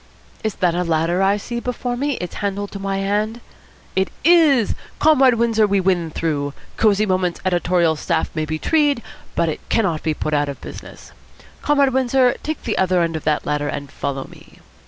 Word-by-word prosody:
"Is 215 -2 -2
that 180 -3 +1
a 180 +1 0
ladder 165 +1 +1
that 195 - +3
I 200 +1 +3
see 235 +3 -5
before 245 0 -3
me, 285 +3 -1
its 180 -8 -5
handle 200 0 -2
to 200 - -8
my 195 0 -2
hand? 210 +4 -1 0.6
It 190 0 +1
is! 305 - +5 0.2
Comrade 270 -5 +5
Windsor, 225 -2 +2
we 200 0 +2
win 180 -3 +1
through. 145 -3 -2 0.2
Cosy 215 -1 +3
Moments' 185 -3 0
editorial 175 -2 +2
staff - - -1
may 155 -1 -1
be 155 +1 -3
tree'd, 290 - +1 0.3
but 170 - +1
it 160 - -2
cannot 185 -9 +1
be 155 -2 -1
put 155 - -3
out 145 -1 +1
of 140 - -6
business. - - -11 0.5
Comrade 280 -3 +3
Windsor, 255 -1 +3
take 310 0 -4
the 225 - -2
other 185 -2 +3
end 165 -1 -2
of 155 - -5
that 150 -1 +1
ladder 150 0 -1
and 140 -1 -5
follow 135 -1 -3
me." - - -17
195 Hz, 195 wpm, -20 LUFS, 165-235 Hz, 0.6 s, is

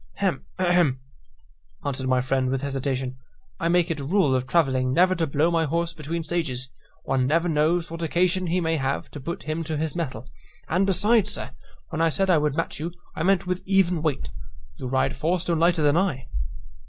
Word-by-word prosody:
"Hem, 185 -8 -1
ahem," 175 -7 +2 0.9
answered 135 -2 -2
my 130 -1 +3
friend 130 0 0
with 135 +1 -1
hesitation; 130 -2 -2 0.4
"I 165 - 0
make 175 0 +3
it 155 - -2
a - - -4
rule 155 -2 +2
of 130 0 0
travelling 130 -5 +2
never 185 +2 +5
to 165 -3 0
blow 150 +4 +2
my 165 -1 +2
horse 170 +2 -1
between 165 +1 -4
stages; 145 -6 -2 0.3
one 130 -1 +1
never 165 +4 +2
knows 165 +2 +1
what 165 0 -6
occasion 180 +3 +1
he 175 +2 +1
may 165 -2 0
have 135 -1 -2
to 145 - -7
put 170 +7 -5
him 155 +2 -2
to 155 -1 -2
his 155 +1 -2
mettle: 130 -8 -4 0.4
and 185 +4 +2
besides, 210 +3 +4
sir, - - -4 0.4
when 160 -1 -2
I 165 - +4
said 190 +4 +1
I 165 - +5
would 150 -1 0
match 165 -2 -2
you, 165 +3 -3 0.2
I - - -4
meant 190 +1 +2
with 180 0 -2
even 185 -4 +3
weight; 140 - -2 0.5
you 130 - -5
ride 130 +1 +1
four 170 +6 0
stone 170 -1 0
lighter 170 -1 +3
than 145 +2 +4
I." 175 -9 0
160 Hz, 205 wpm, -25 LUFS, 135-175 Hz, 0.9 s, never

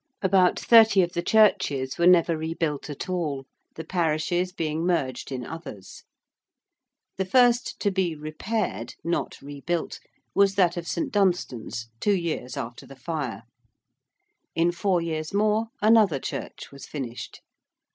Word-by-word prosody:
About 185 -1 +3
thirty 220 -4 +6
of 175 0 -3
the 170 - -1
churches 145 -12 +2
were 170 - +4
never 170 -2 +5
rebuilt 160 -2 -3
at 145 - -6
all, 155 -7 -2 0.3
the 160 - -6
parishes 175 +1 0
being 160 -2 -2
merged 140 -8 -1
in 125 -2 -4
others. 135 - -9 1.2
The 190 - -1
first 245 +3 +3
to 205 - +2
be 185 -4 0
repaired, 155 - -3
not 170 +1 -2
rebuilt, 145 +4 -4 0.3
was 195 0 +3
that 180 -3 +3
of 175 -1 -5
St. 170 - -2
Dunstan's 175 - -1
two 205 -1 +2
years 165 -8 -3
after 120 0 -6
the 135 - -12
fire: 130 -6 -4 1.1
in 170 +1 +3
four 180 0 0
years 160 +1 -3
more, 215 +2 +2 0.2
another 215 -8 +5
church - - -6
was 140 0 -11
finished. 125 -5 -7
170 Hz, 135 wpm, -25 LUFS, 145-190 Hz, 1.2 s, thirty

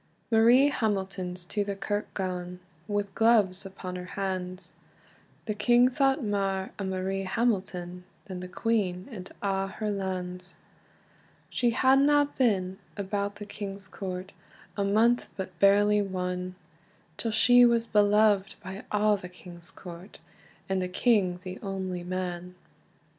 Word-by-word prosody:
Marie 240 +5 +6
Hamilton's 190 -6 -2
to 205 +3 -1
the 200 0 -3
kirk 205 +2 -3
gane, 180 -2 -3 0.3
Wi 205 -1 0
gloves 210 -4 +3
upon 185 -1 -7
her 180 - -6
hands; 185 -2 -4 0.7
The 215 - -1
king 240 +4 +4
thought 270 +1 +2
mair 195 -2 -1
o - - -2
Marie 190 +1 -2
Hamilton, 185 -4 -1 0.2
Than 185 -3 -6
the 180 - -6
queen 185 -2 -1
and 190 -4 -8
a' 195 -1 0
her 210 +2 -3
lands. 185 -2 -4 0.9
She 240 - +2
hadna 275 +4 +4
been 190 -6 +1 0.2
about 200 0 -2
the 205 0 -8
king's 200 -1 -7
court 185 0 -6 0.4
A 200 - 0
month, 225 +5 +3
but 185 -3 -6
barely 205 +2 +5
one, 180 -1 -3 0.6
Till 230 - -2
she 245 +3 +6
was 235 -1 +4
beloved 205 -2 +3
by 190 +3 -7
a' 210 0 +3
the 180 -2 -9
king's 175 -1 -12
court, 180 +2 -11 0.5
And 190 -1 0
the 180 - -2
king 190 -3 +2
the 185 0 -7
only 190 -3 -4
man. 180 0 -4
195 Hz, 135 wpm, -28 LUFS, 185-215 Hz, 0.9 s, Marie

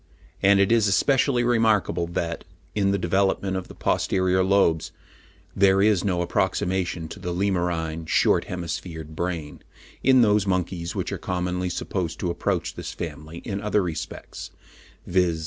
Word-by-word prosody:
"And 100 0 +5
it 100 +2 +3
is 115 -2 +4
especially 125 +4 +3
remarkable 110 -7 +2
that, 85 -1 -3 0.3
in 100 -2 +1
the 100 - +2
development 95 +1 +1
of 95 - -4
the - - -12
posterior 95 0 +1
lobes, 95 -4 +2 0.6
there 95 0 +4
is 100 -2 +3
no 90 -3 0
approximation 90 -1 -1
to 100 - -9
the 90 -2 -4
Lemurine, 85 -4 -1
short - - +3
hemisphered 80 -3 -6
brain, 85 -3 -4 0.4
in 130 -1 +5
those 105 -2 +3
monkeys 90 -2 -1
which - - -2
are - - -4
commonly 90 0 -2
supposed 90 -1 -3
to 90 - 0
approach 85 - -1
this - - -6
family 80 +3 -7
in 100 -2 -3
other 105 -1 +1
respects, 80 -4 -6 0.6
viz. 90 -3 +1
90 Hz, 145 wpm, -24 LUFS, 85-100 Hz, 0.6 s, And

